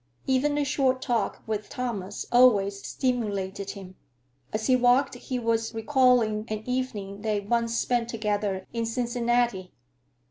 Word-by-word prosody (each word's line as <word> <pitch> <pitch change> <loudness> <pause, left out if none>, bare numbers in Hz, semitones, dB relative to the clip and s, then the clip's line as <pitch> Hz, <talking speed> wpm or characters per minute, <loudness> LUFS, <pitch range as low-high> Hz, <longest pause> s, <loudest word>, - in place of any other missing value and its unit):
Even 280 +3 +1
a 295 - +2
short 265 -2 +1
talk 240 -5 -1
with 215 -1 -3
Thomas 205 -6 -4
always 205 -5 +4
stimulated 200 -6 -2
him. 185 -1 -11 0.5
As 215 0 -2
he 255 - +4
walked 250 +2 +3
he 250 +1 -4
was 230 -1 -1
recalling 235 -3 +3
an 215 0 -4
evening 215 -6 -3
they 215 -1 0
once 230 +3 0
spent 240 -2 0
together 205 -4 -2
in 230 -1 -1
Cincinnati. 240 -4 0
230 Hz, 135 wpm, -26 LUFS, 205-250 Hz, 0.5 s, always